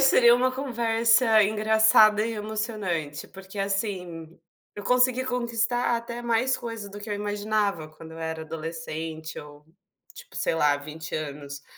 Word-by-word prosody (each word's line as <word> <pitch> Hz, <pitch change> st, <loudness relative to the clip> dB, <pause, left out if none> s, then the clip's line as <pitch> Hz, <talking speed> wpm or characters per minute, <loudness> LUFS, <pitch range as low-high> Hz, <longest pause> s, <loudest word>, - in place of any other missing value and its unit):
seria 240 Hz, -3 st, +7 dB
uma 255 Hz, +1 st, +2 dB
conversa 235 Hz, -3 st, +3 dB
engraçada 215 Hz, 0 st, +5 dB
e 230 Hz, -, -3 dB
emocionante. 210 Hz, -8 st, -3 dB
Porque, 195 Hz, +1 st, -11 dB
assim, 185 Hz, -5 st, -3 dB, 0.4 s
eu 205 Hz, -, -8 dB
consegui 250 Hz, +1 st, +3 dB
conquistar 240 Hz, -1 st, 0 dB
até 235 Hz, +1 st, -6 dB
mais 240 Hz, +2 st, +1 dB
coisa 225 Hz, -4 st, -6 dB
do 205 Hz, +1 st, -9 dB
que 205 Hz, -, -8 dB
eu 210 Hz, -, -1 dB
imaginava, 205 Hz, -4 st, -1 dB
quando 160 Hz, +1 st, -13 dB
eu 165 Hz, -, -10 dB
era 160 Hz, 0 st, -4 dB
adolescente 160 Hz, 0 st, -6 dB
ou, 150 Hz, 0 st, -12 dB, 0.5 s
tipo, 485 Hz, -1 st, -13 dB
sei -, -, 0 dB
lá, 150 Hz, -2 st, +3 dB
20 155 Hz, +2 st, -8 dB
anos. 140 Hz, -2 st, -5 dB
210 Hz, 145 wpm, -26 LUFS, 160-235 Hz, 0.5 s, seria